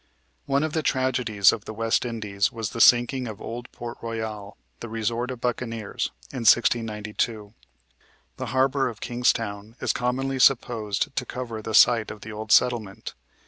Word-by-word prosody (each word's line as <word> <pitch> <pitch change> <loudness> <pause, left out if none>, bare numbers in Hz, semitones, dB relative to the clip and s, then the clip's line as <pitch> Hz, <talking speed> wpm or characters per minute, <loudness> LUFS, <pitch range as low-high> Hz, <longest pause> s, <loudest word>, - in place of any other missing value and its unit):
One 140 +1 +2
of 155 -1 -2
the 160 - +1
tragedies 125 -8 +2
of 105 - -6
the 110 - -7
West 115 +2 +1
Indies 105 -4 -1
was 115 -2 -4
the 115 - -2
sinking 120 +2 +5
of 110 -3 -7
old 120 +2 -7
Port 120 0 -8
Royal, 110 -3 -5 0.2
the 115 - -7
resort 115 +2 -2
of 130 -2 -5
buccaneers, 115 -3 -2 0.2
in 130 - -5
1692. 110 -2 +1 0.8
The - - -4
harbor 135 +2 +1
of 115 - -10
Kingstown 115 -3 -1
is - - 0
commonly 130 +2 -1
supposed 120 0 +2
to - - 0
cover 115 -3 -5
the 110 0 -3
site 115 -1 +5
of 105 - -9
the 110 - -8
old 110 0 -6
settlement. 115 -6 +2
115 Hz, 160 wpm, -25 LUFS, 110-125 Hz, 0.8 s, sinking